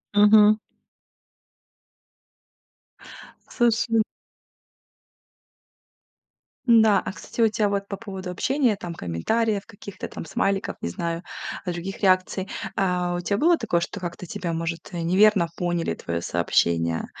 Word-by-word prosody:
Мгм. 210 +1 +7 2.9
Слушай 230 -1 +2 2.7
М-да, 220 -3 +6
а - - -5
кстати 235 - -5
у 225 - +6
тя 210 -1 +1
вот 200 0 -2
по 200 - -5
поводу 190 -4 -7
общения, 255 +5 +1
там 175 -4 -7
комментариев, 200 - -1
каких-то 200 -2 -9
там - - -8
смайликов, 195 +5 -1
не - - -2
знаю, 170 - -3 0.4
других 180 +2 -4
реакций. 185 0 +2 0.3
А 180 -2 0
у 175 - -2
тя 200 +3 -1
было 335 +4 +4
такое, 210 -7 0
что 200 - -4
как-то 175 0 -6
тебя 170 0 -4
может, 165 0 -4
э, 170 - -3
неверно 190 +1 +4
поняли 175 -1 -1
твоё 85 0 -4
сообщение, 85 -1 +1
190 Hz, 120 wpm, -24 LUFS, 170-215 Hz, 2.9 s, Мгм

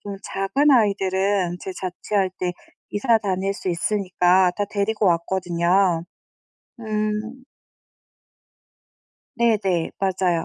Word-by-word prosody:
좀 200 -1 -7
작은 270 +12 +1
아이들은 195 -5 +2
제가 190 - -6
자취할 190 +1 -1
때 180 -1 -1 0.4
이사 225 +2 +2
다닐 195 -2 -1
수 190 - -5
있으니까 180 0 +2
다 205 - 0
데리고 210 +1 -1
왔거든요. 175 0 +1 0.8
음. 215 +3 -3 1.9
네네. 210 -8 +1
맞아요. 185 -3 0
195 Hz, 205 characters per minute, -22 LUFS, 180-210 Hz, 1.9 s, 아이들은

